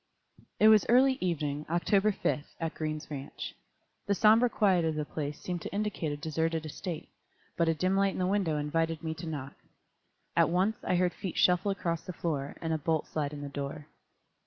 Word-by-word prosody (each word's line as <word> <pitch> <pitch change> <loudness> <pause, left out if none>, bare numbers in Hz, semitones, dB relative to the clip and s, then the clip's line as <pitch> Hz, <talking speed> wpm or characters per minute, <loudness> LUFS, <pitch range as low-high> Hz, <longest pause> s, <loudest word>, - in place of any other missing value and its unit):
_ - - -27 0.2
It 215 - +7
was 215 -2 +7
early 260 +2 +5
evening, 150 -5 -1
October 195 +5 +3
5, 150 -6 -1 0.2
at 165 -1 -2
Green's 155 -1 -4
ranch. 140 -1 -6 0.5
The 200 - +2
somber 225 +4 +5
quiet 190 -6 +3
of 160 -1 0
the 150 -1 -2
place 145 -1 -4
seemed 175 -2 -4
to - - -6
indicate 205 -6 -2
a 145 - -3
deserted 160 +1 -1
estate, 165 +1 -5 0.5
but 170 -1 +2
a 165 - +2
dim 185 +5 +1
light 195 0 +2
in - - -6
the 185 - +1
window 185 -5 +1
invited 165 +2 -1
me 160 -1 -2
to 165 +1 -8
knock. 140 -4 -5 0.8
At - - +4
once 190 +5 +1
I 180 - +1
heard 180 0 +2
feet 190 -4 -5
shuffle 180 +2 +4
across 170 -4 -1
the 180 - -6
floor, 145 -5 -3
and 165 -1 -1
a 160 - 0
bolt 160 +1 0
slide 145 -2 -2
in 145 -1 -7
the 145 - -5
door. 145 +2 -6
165 Hz, 205 wpm, -30 LUFS, 150-190 Hz, 0.8 s, It